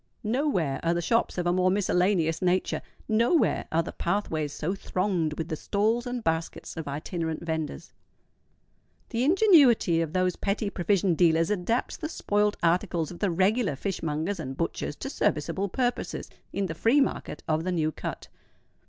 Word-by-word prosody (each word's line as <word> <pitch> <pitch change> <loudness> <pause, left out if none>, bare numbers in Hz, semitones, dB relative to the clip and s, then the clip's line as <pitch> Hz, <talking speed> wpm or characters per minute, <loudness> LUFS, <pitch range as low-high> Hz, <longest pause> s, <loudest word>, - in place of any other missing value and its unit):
Nowhere 215 - 0
are 170 +1 +1
the - - 0
shops 230 +3 +1
of 175 - -1
a 175 - +2
more 185 0 +3
miscellaneous 180 -4 +1
nature: 185 0 +1 0.3
nowhere 235 +9 +2
are 165 +1 +2
the - - -6
pathways 165 -6 -1
so 160 +5 -2
thronged 185 -5 -1
with 165 +1 -4
the 160 - -1
stalls 220 +8 0
and 245 -1 -3
baskets 165 0 -2
of 160 -2 -5
itinerant 160 +3 -3
venders. 160 -2 -4 1.2
The 235 +1 -1
ingenuity 285 - +5
of 160 -1 -3
those 185 -1 +1
petty 200 +1 -1
provision 190 0 +1
dealers 165 +1 +3
adapts 210 +5 -1
the 310 - -4
spoilt 210 -7 0
articles 170 -1 +1
of 175 - -10
the 200 - +1
regular 195 - +2
fishmongers 165 +2 -2
and 135 -4 -5
butchers 165 -3 -2
to 270 - -6
serviceable 190 - 0
purposes 245 +3 -2 0.2
in 200 - -1
the 170 - -3
free 230 - +3
market 275 - -1
of 160 0 +1
the 185 - -1
New 155 -3 +1
Cut. - - -6
180 Hz, 160 wpm, -27 LUFS, 165-210 Hz, 1.2 s, ingenuity